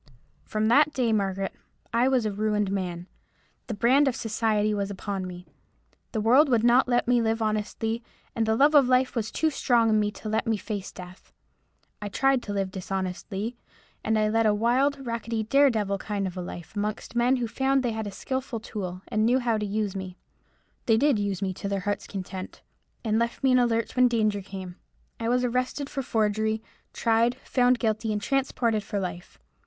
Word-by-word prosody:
"From 215 0 -1
that 290 +6 +5
day, 240 -4 +1
Margaret, 195 -2 -1 0.4
I 235 +2 +3
was 260 -4 +2
a 215 - 0
ruined 210 -1 0
man. 180 -3 -3 0.6
The 225 - -3
brand 260 +7 +4
of 260 - +1
society 215 -1 0
was 200 -1 -2
upon 195 -1 -4
me. 180 0 -9 0.7
The 220 - -2
world 255 +8 +5
would 235 -3 +3
not 245 +2 +5
let 245 -1 +1
me 245 -1 +4
live 225 0 0
honestly, 220 +1 -1 0.3
and 225 -1 0
the 220 - +3
love 285 +6 +4
of 285 -4 +6
life 255 +1 +2
was 220 -2 -1
too 315 +6 0
strong 235 -5 +2
in 215 - +4
me 210 0 +1
to 220 - -9
let 220 +2 -1
me 225 -1 +2
face 205 -2 -5
death. 180 +1 -12 0.7
I 205 - -4
tried 270 +4 +2
to 210 - -6
live 195 -2 -1
dishonestly, 190 +4 -4 0.5
and 220 0 +1
I 215 0 +2
led 225 +1 +2
a 210 - +3
wild, 265 +5 +1
rackety, 230 -1 -2
dare 275 +6 +4
devil 205 -4 -1
kind 205 -1 -3
of 185 -1 -4
a 180 - -4
life, 175 +2 -8
amongst 210 +3 -3
men 245 +2 +3
who 245 -2 -1
found 265 +4 +1
they 240 - 0
had 220 -1 -4
a - - -5
skilful 260 +4 -4
tool, 190 -4 -6
and 215 0 0
knew 240 +3 +4
how 235 -4 0
to 210 - -2
use 205 -1 -2
me. 185 -1 -6 0.7
They 225 -2 +5
did 275 -2 +3
use 200 -1 -2
me 190 -1 -1
to 200 - -5
their 200 -1 -1
heart's 205 +1 -3
content, 190 -1 -7 0.4
and 220 0 +2
left 235 +2 -2
me 265 - +4
in 255 - +5
the 245 -1 +4
lurch 230 0 -1
when 255 -1 +5
danger 215 -4 +1
came. 190 -2 -8 0.4
I 230 0 -1
was 250 +1 +2
arrested 255 +3 -1
for 275 - -2
forgery, 220 -2 0 0.3
tried, 230 +1 +2
found 250 -1 +3
guilty, 220 -1 -1
and 210 - 0
transported 235 -2 0
for 205 0 -3
life. 175 -2 -6
220 Hz, 200 wpm, -26 LUFS, 205-245 Hz, 0.7 s, of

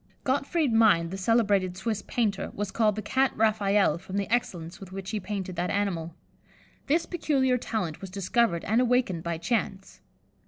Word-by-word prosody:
'" - - -37
Gottfried 280 +1 +1
Mind, 205 -7 +4
the - - -4
celebrated 200 -3 +2
Swiss 210 +1 -2
painter, 215 -5 -1
was 205 -1 -3
called 215 -3 +2
the 215 - -4
"Cat 265 +5 +2
Raphael," 205 -6 +2
from 190 +3 -6
the 200 - -1
excellence 175 -8 -2
with 190 -2 -11
which 190 0 -6
he 215 - -1
painted 195 -3 -5
that 180 +1 -1
animal. 170 -5 -2 0.7
This 330 +4 +2
peculiar 270 -7 +1
talent 185 -10 -3
was 195 - -7
discovered 195 -1 0
and 225 +4 +2
awakened 245 -8 +1
by 170 0 -3
chance. 195 +1 -3
205 Hz, 170 wpm, -27 LUFS, 185-235 Hz, 0.7 s, Mind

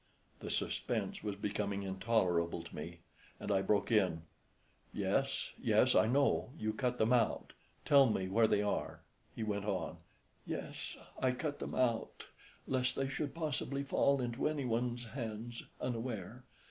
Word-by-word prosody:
The - - -6
suspense - - -1
was 105 -2 -3
becoming 100 0 -2
intolerable 95 -4 +1
to 85 - -11
me, - - -7 0.4
and - - -3
I 95 -1 +3
broke 100 +3 +1
in, 90 -7 +3 0.7
"Yes, - - 0
yes, - - +4
I 110 - +5
know; 140 +3 +3
you 110 -4 -1
cut 125 +2 0
them 110 +2 +3
out. 120 -3 +1 0.3
Tell 140 -2 +7
me 95 -4 0
where 110 +4 +4
they 105 - +3
are," 105 - -2 0.3
He 115 - -3
went 100 -2 -1
on 95 -7 -2 0.5
"Yes, - - -5 0.2
I 130 -1 +2
cut 145 +3 -3
them - - -4
out 120 -3 0 0.4
lest 130 -1 +1
they 135 0 0
should 145 +2 -3
possibly 140 -3 -2
fall 140 0 +3
into 120 +4 0
anyone's 125 -4 -1
hands 115 -1 -5 0.2
unaware. 120 -1 -4
115 Hz, 145 wpm, -35 LUFS, 100-130 Hz, 0.7 s, Tell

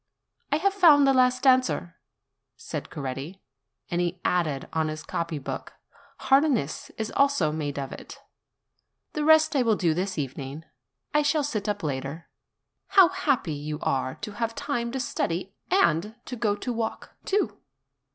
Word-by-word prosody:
"I - - +4
have 390 +6 +2
found 320 -8 +7
the 270 - +4
last 255 0 +3
answer," 255 -9 +3 0.6
said - - -6
Coretti; 140 +6 -5 0.5
and 175 0 +1
he 175 +1 -2
added 155 -6 0
on 160 -1 +1
his 155 0 -5
copy 165 -2 -3
book, 140 - -6 0.5
Harness 270 - +2
is 220 0 -3
also 275 - +2
made 150 -2 -3
of 135 -1 -4
it. - - -10 0.9
'The 300 - -1
rest 315 0 +5
I 270 - +4
will 230 -3 +3
do 170 -5 +1
this 185 +2 -2
evening; 140 +2 -5 0.5
I 300 - +4
shall 295 +1 +2
sit 215 -8 -2
up 205 -1 -2
later. 140 +2 -4 0.6
How 380 -4 +7
happy 285 - 0
you 150 +1 -4
are, 130 -1 0
to 210 - -5
have 230 +2 -3
time 285 -5 -2
to 265 - -2
study 190 -6 -2 0.2
and 210 - +2
to 250 - -5
go 215 -3 +1
to 245 +4 -4
walk, 225 -1 -4
too!" 305 - 0
205 Hz, 160 wpm, -26 LUFS, -, 0.9 s, found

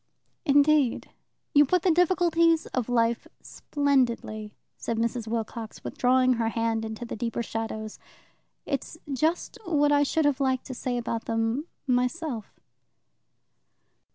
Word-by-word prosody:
"Indeed, 285 -3 +3 0.4
you 290 - +7
put 355 +5 +1
the 370 - +4
difficulties 335 -1 +3
of 255 -2 -3
life 235 -1 +1 0.2
splendidly," 240 -7 -1 0.2
said 230 - -3
Mrs. 230 0 -1
Wilcox, 225 0 -4
withdrawing 255 0 +3
her 230 -2 0
hand 225 -1 -1
into 220 +2 -5
the - - -5
deeper 230 +1 -2
shadows. 220 -1 -5 0.7
"It 275 -3 -1
is 325 - -12
just 315 +6 -1
what 295 -5 +2
I 290 0 +4
should 300 +2 +1
have 290 -1 +2
liked 260 -2 0
to 260 - -6
say 245 0 -2
about 230 -1 -3
them 225 +6 -1 0.2
myself." 250 -1 -1
250 Hz, 130 wpm, -27 LUFS, 230-290 Hz, 0.7 s, you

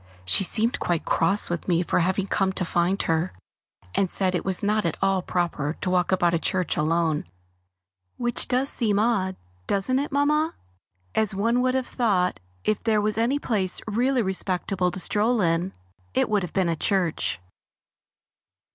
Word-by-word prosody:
She 90 - +4
seemed 225 +5 +1
quite 175 -2 -1
cross 195 +5 +2
with 175 -1 -4
me 175 -1 +2
for - - 0
having 185 +2 0
come 195 -1 0
to 185 - -2
find 175 +3 0
her, 165 +2 0 0.6
and 195 -2 +1
said 185 0 0
it 180 - -1
was 190 0 0
not 210 +1 +1
at 165 -3 -1
all 195 -1 +1
proper 170 -4 -2
to - - -2
walk 180 0 +1
about 175 -2 +2
a 170 - +2
church 185 0 0
alone, 160 0 +1 0.9
which 240 -1 0
does 260 +2 +1
seem 215 -4 +1
odd, 205 -4 +1 0.3
doesn't 230 +7 +1
it, 285 - -3
Mamma? 300 +3 +1 0.6
As 215 -2 +1
one 230 +5 +1
would 255 0 +1
have 260 -1 0
thought 195 - 0 0.2
if 215 - 0
there 220 -2 +2
was 210 +1 0
any 245 +5 +2
place 200 -9 0
really 245 +3 +1
respectable 185 -1 0
to 185 - -5
stroll 220 +5 +1
in, 170 0 +1 0.4
it - - +2
would 210 -2 +2
have 180 -3 -5
been 190 -2 +1
a 165 - 0
church. 175 - +1
195 Hz, 175 wpm, -25 LUFS, 175-225 Hz, 0.9 s, She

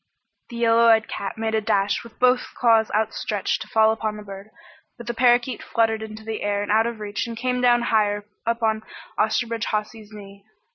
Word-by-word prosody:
The 240 - -9
yellow 230 0 +4
eyed 220 -1 +4
cat 200 +1 -5
made 220 0 -2
a 220 - +1
dash 205 -2 0
with 235 - -15
both 250 0 +2
clawing 225 -2 +4
paws - - -14
outstretched 215 -1 -1
to - - -7
fall 220 -2 +4
upon 215 -1 -3
the 210 - -9
bird, 200 +1 -10 0.5
but 240 - -10
the 240 - -3
parakeet 240 0 +2
fluttered 225 -1 0
into 220 0 -8
the 220 -1 -5
air 205 0 -1
out 220 +2 +3
of 235 -2 -5
reach 205 +1 -4
and 230 -1 -7
came 250 +1 -1
down 240 -1 +4
higher 205 -2 +1 0.2
up 230 +1 -2
on 220 -1 +1 0.4
Osterbridge 230 +1 0
Hawsey's 215 0 -4
knee. 200 -1 -12
220 Hz, 200 wpm, -23 LUFS, 210-235 Hz, 0.5 s, yellow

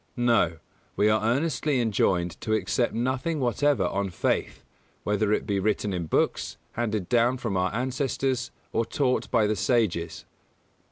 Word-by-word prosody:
No: 115 -9 +2 0.4
we 105 - +3
are 110 0 +2
earnestly 140 +3 +1
enjoined 95 -6 0
to 110 - -1
accept 110 +4 0
nothing 130 +7 -1
whatever 130 -3 +2
on 100 +2 -1
faith; 90 - -1 0.4
whether 105 0 +1
it 105 - +1
be 100 -2 0
written 105 0 0
in 85 -3 -3
books, - - 0
handed 110 -5 -2
down 120 +1 +3
from 115 -6 -3
our 90 0 +1
ancestors, 130 +1 -1 0.2
or 115 - +2
taught 130 +1 0
by 115 -3 +3
the 105 +1 +1
sages. 95 -5 0
115 Hz, 150 wpm, -26 LUFS, 100-125 Hz, 0.4 s, we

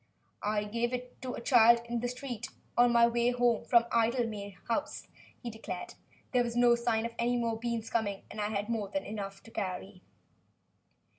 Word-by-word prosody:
"I 210 0 0
gave 235 +4 -1
it 250 0 -6
to 255 -1 -4
a - - -6
child 235 -1 +6
in 235 0 -2
the 245 - -1
street, 245 -2 -5 0.3
on 240 0 +5
my 235 0 +6
way 235 +1 +2
home 245 -2 +2
from 235 -2 +5
Idlemay 225 -4 0
House," 240 +5 -2 0.4
he 240 - -4
declared. 210 -5 -6 0.4
"There 250 -2 +3
was 235 -1 -4
no 240 0 +6
sign 235 -1 +1
of 235 - -3
any 240 +1 +2
more 230 -2 -1
beans 230 -1 -3
coming 205 -4 -1
and 215 - -4
I 210 - 0
had 205 -1 -2
more 220 -4 -2
than 290 +7 -3
enough 200 -2 -6
to 225 - -14
carry." 190 -2 -4
235 Hz, 190 wpm, -31 LUFS, 215-240 Hz, 0.4 s, child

